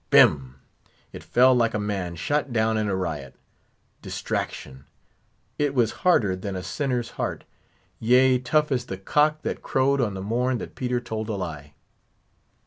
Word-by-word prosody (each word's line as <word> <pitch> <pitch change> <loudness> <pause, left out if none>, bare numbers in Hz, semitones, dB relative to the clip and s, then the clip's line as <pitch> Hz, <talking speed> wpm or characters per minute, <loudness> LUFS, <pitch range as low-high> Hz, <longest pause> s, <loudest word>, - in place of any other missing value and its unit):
Bim! 65 -3 +5 0.6
it - - -8
fell 130 +1 +4
like 115 -3 +2
a - - 0
man 100 -4 -3
shot 145 - -1
down 110 -1 +1
in 110 -1 0
a 100 - 0
riot. 80 -7 -4 0.7
Distraction! 65 +1 -5 0.7
It 145 -1 0
was 120 -4 +3
harder 110 - +3
than 95 +1 -5
a 90 - -4
sinner's 120 +5 -2
heart; - - -3 0.6
yea, 125 +2 +4
tough 150 +4 +1
as 125 -2 -1
the 95 - -5
cock 150 +10 +1
that - - -3
crowed 135 +1 +1
on 105 -5 -1
the 95 - -5
morn 125 +4 0
that - - -7
Peter 125 -1 -1
told 110 -2 -5
a 110 - -1
lie. 75 -6 -6
110 Hz, 160 wpm, -25 LUFS, 95-130 Hz, 0.7 s, Bim